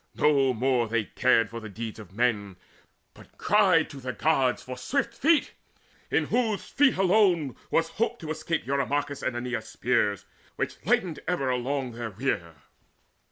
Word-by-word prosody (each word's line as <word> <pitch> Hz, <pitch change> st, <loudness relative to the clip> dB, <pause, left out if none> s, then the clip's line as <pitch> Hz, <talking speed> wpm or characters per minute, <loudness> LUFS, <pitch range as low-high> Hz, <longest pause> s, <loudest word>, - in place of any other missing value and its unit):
No 140 Hz, -3 st, +3 dB
more 125 Hz, 0 st, +1 dB
Cared 110 Hz, -1 st, -2 dB
they 125 Hz, -4 st, +3 dB
for 115 Hz, -2 st, -7 dB
deeds 110 Hz, +2 st, -6 dB
of 105 Hz, -4 st, -11 dB
men, 105 Hz, -3 st, 0 dB, 0.6 s
but -, -, -18 dB
cried 185 Hz, -5 st, +4 dB
to 140 Hz, -, -9 dB
the 130 Hz, -1 st, -4 dB
Gods 135 Hz, -5 st, +1 dB
For 130 Hz, -, -6 dB
swift 235 Hz, -, -1 dB
feet, 305 Hz, +6 st, +2 dB, 0.6 s
in -, -, +1 dB
whose 225 Hz, -5 st, 0 dB
feet 280 Hz, -5 st, +3 dB
alone 185 Hz, -, +3 dB
was 165 Hz, 0 st, +1 dB
hope 230 Hz, +6 st, -1 dB
To 155 Hz, -1 st, -5 dB
escape 160 Hz, -1 st, -2 dB
Eurymachus' 140 Hz, +1 st, -1 dB
and 120 Hz, -, -2 dB
Aeneas' 120 Hz, -2 st, -4 dB
spears 110 Hz, -4 st, 0 dB, 0.3 s
Which -, -, -4 dB
lightened 170 Hz, -5 st, +1 dB
ever 140 Hz, -7 st, 0 dB
all 125 Hz, -, 0 dB
along 130 Hz, 0 st, -2 dB
their 115 Hz, 0 st, -5 dB
rear. 95 Hz, -7 st, -3 dB
135 Hz, 160 wpm, -27 LUFS, 115-165 Hz, 0.6 s, cried